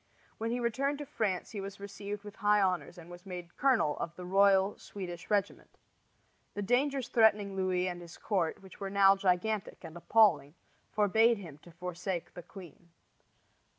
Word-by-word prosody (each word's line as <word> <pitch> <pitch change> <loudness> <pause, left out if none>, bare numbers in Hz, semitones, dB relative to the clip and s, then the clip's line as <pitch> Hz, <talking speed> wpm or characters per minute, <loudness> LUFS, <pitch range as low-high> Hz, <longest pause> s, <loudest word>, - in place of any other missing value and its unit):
When 225 +1 -2
he 240 +1 -1
returned 265 +5 0
to 290 - -6
France 200 -8 -2
he 205 - -5
was 195 +1 -8
received 200 +1 -7
with 205 0 -11
high 210 -1 +3
honors 185 -2 0
and 170 -1 -11
was 175 0 -11
made 180 -3 -8
colonel 250 - +2
of 170 0 -4
the 180 - -8
royal 195 +1 +3
Swedish 180 -3 -8
regiment. 205 -2 -1 0.8
The 205 - -2
dangers 260 +4 +1
threatening 210 -3 +3
Louis 185 -1 0
and 175 -1 -5
his 170 -1 -11
court, 185 -3 -1
which 190 - -14
were 195 - -4
now 195 0 +5
gigantic 195 +2 -1
and 165 -1 -9
appalling, 170 -6 +3 0.4
forbade 220 +3 +3
him 165 -7 -10
to 175 - -16
forsake 180 +1 -5
the 175 - -8
queen. 175 -2 -13
195 Hz, 170 wpm, -31 LUFS, 180-210 Hz, 0.8 s, now